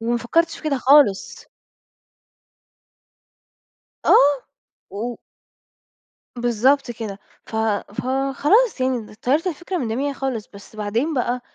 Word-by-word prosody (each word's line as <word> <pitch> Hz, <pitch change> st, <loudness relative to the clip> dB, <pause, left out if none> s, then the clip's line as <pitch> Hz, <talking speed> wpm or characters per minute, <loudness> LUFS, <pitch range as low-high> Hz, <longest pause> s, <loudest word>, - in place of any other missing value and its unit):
وما 235 Hz, +1 st, 0 dB
فكرتش 330 Hz, +8 st, 0 dB
في -, -, -14 dB
كده 295 Hz, -3 st, 0 dB
خالص. 260 Hz, -6 st, +3 dB, 2.6 s
آه، 280 Hz, -1 st, +5 dB, 0.5 s
و 230 Hz, +4 st, -4 dB, 1.2 s
بالضبط 245 Hz, +3 st, +2 dB
كده، 220 Hz, -4 st, -6 dB, 0.3 s
ف 220 Hz, -, -6 dB, 0.4 s
فخلاص 275 Hz, -, +1 dB
يعني 255 Hz, -1 st, +1 dB
د -, -, -14 dB
طيّرت 290 Hz, +8 st, +1 dB
الفكرة 355 Hz, +2 st, -3 dB
من 245 Hz, -, -2 dB
دماغي 270 Hz, +6 st, -1 dB
خالص 260 Hz, -6 st, -4 dB
بس 200 Hz, +2 st, -14 dB
بعدين 225 Hz, +9 st, -1 dB
بقى 250 Hz, -1 st, -1 dB
255 Hz, 110 wpm, -21 LUFS, 230-285 Hz, 2.6 s, آه